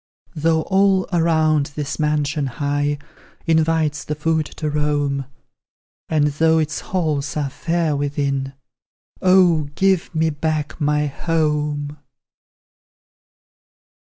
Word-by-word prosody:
Though 160 0 +1
all 195 -1 +3
around 160 -3 +2
this 150 +1 -4
mansion 150 -1 0
high 145 +2 -1 0.5
Invites 160 -2 +1
the 150 - -3
foot 160 0 0
to 155 - -2
roam, 145 -2 0 0.8
And 150 -2 +2
though 160 +2 +2
its 155 0 -1
halls 155 -6 -2
are 140 -2 -1
fair 165 0 -1
within 140 -1 -2 0.7
Oh, 180 -5 +4
give 190 -3 +1
me 160 0 +2
back 155 +1 -3
my 150 0 +2
HOME! 150 -1 -1
150 Hz, 100 wpm, -20 LUFS, 145-160 Hz, 0.8 s, Oh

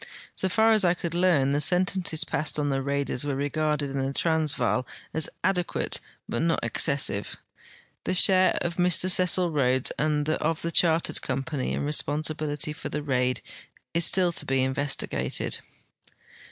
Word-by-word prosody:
So 190 - -1
far 220 +3 +3
as 215 -2 +3
I 175 -1 +3
could 170 -1 -5
learn, 170 -6 +2
the 145 +1 0
sentences 180 -1 +2
passed 150 +2 -1
on 145 -1 -1
the 135 -1 -1
raiders 140 -1 -2
were 145 -2 -2
regarded 145 +1 -1
in 135 - -3
the 135 0 -2
Trans 160 0 0
vaal 125 -1 -1 0.3
as 160 -1 +2
adequate 180 -2 0 0.3
but 120 - -3
not 165 0 0
excessive. 140 -9 0 0.7
The - - 0
share 185 0 +5
of 170 0 -3
Mr 180 +1 +2
Cecil 180 -1 +3
Rhodes 130 -3 +1
and 150 -1 0
of 155 0 -1
the 170 - -2
Chartered 165 -1 +1
Company 135 +1 -3
in - - -2
responsibility 150 0 -1
for - - -7
the 150 - -4
raid 125 -3 -1 0.5
is 170 +1 +2
still 180 0 +4
to - - -3
be 135 -1 +1
investigated. 135 +2 -2
150 Hz, 160 wpm, -26 LUFS, 140-175 Hz, 0.7 s, share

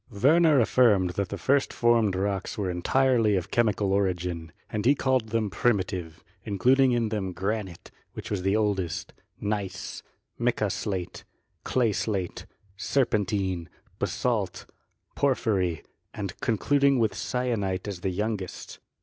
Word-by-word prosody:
Werner 150 +7 +4
affirmed 110 -6 +4
that 100 +1 -2
the - - -4
first 140 +1 +2
formed 115 -5 +3
rocks 100 +2 -2
were 95 -3 -1
en 90 0 -4
tirely 125 -3 +3
of 90 -3 -3
chemical 105 -4 +2
origin, 90 -4 -1 0.2
and 105 -1 -2
he 135 +5 +5
called 130 -5 +1
them 110 -2 0
Primitive, 95 -5 -1 0.2
including 125 +6 +3
in 120 -2 +1
them 100 -4 -3
granite, 95 0 -4 0.2
which - - -8
was 100 -3 -1
the 95 +2 +1
oldest, 100 -5 -1 0.3
gneiss, 100 -3 -3 0.4
mica - - +1
slate, 95 -4 -4 0.4
clay 120 -4 +1
slate, 95 -2 -3 0.3
serpentine, 95 -5 0 0.3
basalt, - - -1 0.5
porphyry, 100 - +1 0.3
and 100 -4 -4
concluding 140 +4 +2
with 110 -4 +2
syenite 110 -7 -2
as 95 -4 -5
the 95 - -1
youngest. 100 0 -4
105 Hz, 130 wpm, -27 LUFS, 95-120 Hz, 0.5 s, he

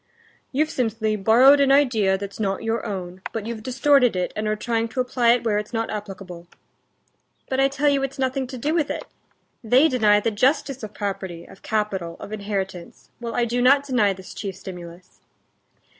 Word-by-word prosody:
"You've 305 +4 0
simply 220 -3 -1
borrowed 240 +8 +6
an 275 -1 +4
idea 225 -9 +3
that's 200 +1 -8
not 195 0 -1
your 225 +1 -1
own, 185 -2 -6
but 220 -2 -4
you've 230 -1 -5
distorted 260 -1 +3
it, 180 -1 -2
and 215 0 -2
are 215 - +1
trying 230 +1 -1
to 240 - -6
apply 245 -2 +3
it 245 - -1
where 210 -3 +1
it's 210 +3 -8
not 225 0 -2
applicable." 195 -4 -7 1.0
"But 265 - -1
I 270 - +5
tell 275 +2 -1
you 280 -1 +3
it's 270 0 -4
nothing 265 0 -1
to 255 0 -7
do 290 +6 -1
with 320 -4 +1
it. - - -3 0.6
They 250 +7 +5
deny 215 -7 +4
the 225 +2 -1
justice 265 +4 +1
of 215 -2 -8
property, 195 -4 -4
of - - -16
capital, 195 -6 -2
of 210 - -8
inheritance, 195 -4 -5
while 235 -1 -5
I 240 - +2
do 240 +1 -1
not 275 +3 +5
deny 250 -7 +2
this 190 -1 -9
chief 195 -3 -5
stimulus." 180 -2 -11
225 Hz, 190 wpm, -23 LUFS, 200-260 Hz, 1.0 s, borrowed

